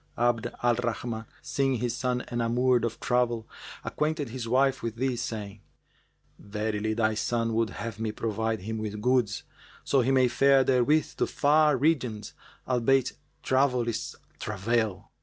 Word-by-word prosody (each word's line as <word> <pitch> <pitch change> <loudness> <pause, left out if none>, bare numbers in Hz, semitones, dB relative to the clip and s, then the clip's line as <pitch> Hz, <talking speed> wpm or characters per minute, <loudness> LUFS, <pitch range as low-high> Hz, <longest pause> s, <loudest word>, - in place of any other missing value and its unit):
Abd 120 -1 +1 0.2
al 120 0 +4
Rahman, 120 -1 -3 0.2
seeing 140 -4 0
his 120 0 -2
son 125 -1 -1
enamoured 120 +1 +2
of 115 -1 -4
travel, 120 -2 0 0.4
acquainted 150 -3 -1
his 120 -1 -5
wife 135 +3 +2
with 115 -1 -3
this, 125 0 -1
saying, 105 -4 -5 0.8
"Verily 105 +1 -2
thy 110 -1 +2
son 115 +1 -1
would 115 0 +1
have 115 -3 -6
me 110 -1 -1
provide 110 0 -2
him 110 +3 -4
with 105 -1 -4
goods, 120 -2 +1 0.4
so 135 - +3
he 125 - 0
may 130 -1 +4
fare 135 +2 +4
therewith 135 +4 +2
to - - +1
far 150 0 +3
regions, 125 -7 0 0.3
albeit 130 +1 +2 0.3
Travel 130 -2 +2
is 115 - -3 0.2
Travail." 105 -1 -1
120 Hz, 145 wpm, -28 LUFS, 110-130 Hz, 0.8 s, al